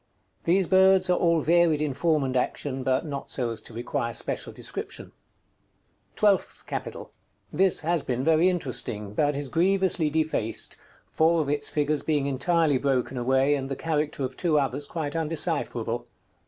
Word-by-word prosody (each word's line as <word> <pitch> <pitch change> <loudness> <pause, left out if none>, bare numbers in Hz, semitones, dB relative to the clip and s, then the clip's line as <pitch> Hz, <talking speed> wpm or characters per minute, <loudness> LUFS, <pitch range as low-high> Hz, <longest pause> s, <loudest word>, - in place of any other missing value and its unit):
These 185 +3 +3
birds 190 0 +4
are 180 - +3
all 170 -2 +3
varied 170 -1 +3
in 150 -2 -1
form 155 0 +1
and 130 -1 -2
action, 130 +1 -1
but 130 +2 0
not 140 -3 -5
so 120 -3 -1
as 115 - -6
to - - -9
require 120 0 -3
special - - -2
description. - - -6
§ - - -19
XCV. - - -40
TWELFTH 205 -3 +1
CAPITAL. - - -6 0.4
This 190 -1 +2
has 165 0 0
been 125 -1 -2
very 165 +4 +4
interesting, 125 - -2
but 145 +5 +1
is 140 0 -3
grievously 185 +1 +1
defaced, 155 -8 -2 0.4
four 165 +1 +3
of 150 -3 -1
its 145 0 +1
figures 150 0 0
being 150 -3 0
entirely 145 +1 +1
broken 135 -1 0
away, 130 +3 +2
and 135 -2 -2
the 135 - -2
character 150 -2 -2
of 130 0 -4
two 165 -1 +1
others 140 +1 -2
quite 155 -3 -4
undecipherable. 150 -8 -1
150 Hz, 165 wpm, -26 LUFS, 130-165 Hz, 0.4 s, birds